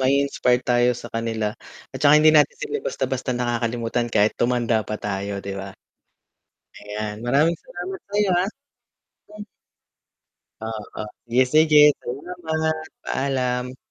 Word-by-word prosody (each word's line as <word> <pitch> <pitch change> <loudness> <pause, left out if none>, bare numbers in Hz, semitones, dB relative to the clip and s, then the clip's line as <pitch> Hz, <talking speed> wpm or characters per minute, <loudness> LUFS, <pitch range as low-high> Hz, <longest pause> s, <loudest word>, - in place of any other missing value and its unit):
mai-inspire 130 -2 +2
tayo 120 0 +3
sa - - -8
kanila. 115 -2 -1 0.4
At - - -6
saka 145 0 +7
hindi 155 +1 +6
natin 150 -2 +4
sila - - -3
basta-basta 130 -1 -2
nakakalimutan 120 0 -1
kahit 105 0 +4
tumanda 120 -2 +1
pa 105 - -2
tayo, 100 0 -3
di 100 - -4
ba? 95 0 -7 1.1
Ayan, 105 +1 -5
maraming 145 +7 +3
salamat 180 +2 -7
sa'yo, 205 -1 +1
ah. - - -2 0.8
Hmm. 210 0 -10 1.2
Oo, 110 -1 -6 0.3
yes, 130 0 +4
sige 155 -1 +6 0.2
salamat. 160 +3 -3 0.3
Paalam. 125 -2 -1
125 Hz, 120 wpm, -23 LUFS, 115-150 Hz, 1.2 s, saka